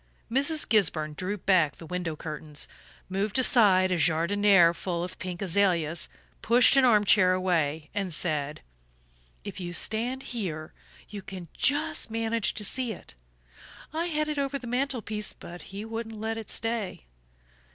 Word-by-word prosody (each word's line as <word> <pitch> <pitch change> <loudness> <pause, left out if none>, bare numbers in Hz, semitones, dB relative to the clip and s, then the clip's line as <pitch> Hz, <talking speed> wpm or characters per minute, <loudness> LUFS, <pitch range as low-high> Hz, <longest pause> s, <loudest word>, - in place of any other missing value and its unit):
Mrs. 285 +5 +2
Gisburn 155 -8 +2
drew 185 +6 -4
back 175 -6 +2
the 165 - -11
window 175 -2 -4
curtains, 150 -1 -6 0.4
moved 195 +3 -1
aside 200 -7 +5
a 180 - +1
JARDINIÈRE 175 +2 +4
full 170 -1 -3
of 180 0 -7
pink 180 +1 -5
azaleas, 175 -4 +1 0.3
pushed 245 +4 +6
an 270 - +5
arm 220 -5 +5
chair 185 -2 +5
away, 160 -5 -1
and 195 -3 -2
said: 150 -2 -2 0.8
"If - - -7
you 175 -1 -5
stand 240 +8 0
here 160 -9 -5 0.4
you 205 -1 -7
can 185 -3 -9
just 290 -2 +1
manage 225 -1 -1
to 210 - -1
see 255 +2 -2
it. - - -11 0.8
I 330 +2 -1
had 305 -2 -1
it 300 -1 -2
over 280 0 -1
the 255 - -11
mantel 250 0 -1
piece, 210 0 -2
but 175 +1 -11
he 200 +3 -7
wouldn't 225 -1 -6
let 220 +1 -2
it 220 - -10
stay." 225 - -2
200 Hz, 155 wpm, -27 LUFS, 175-230 Hz, 0.8 s, pushed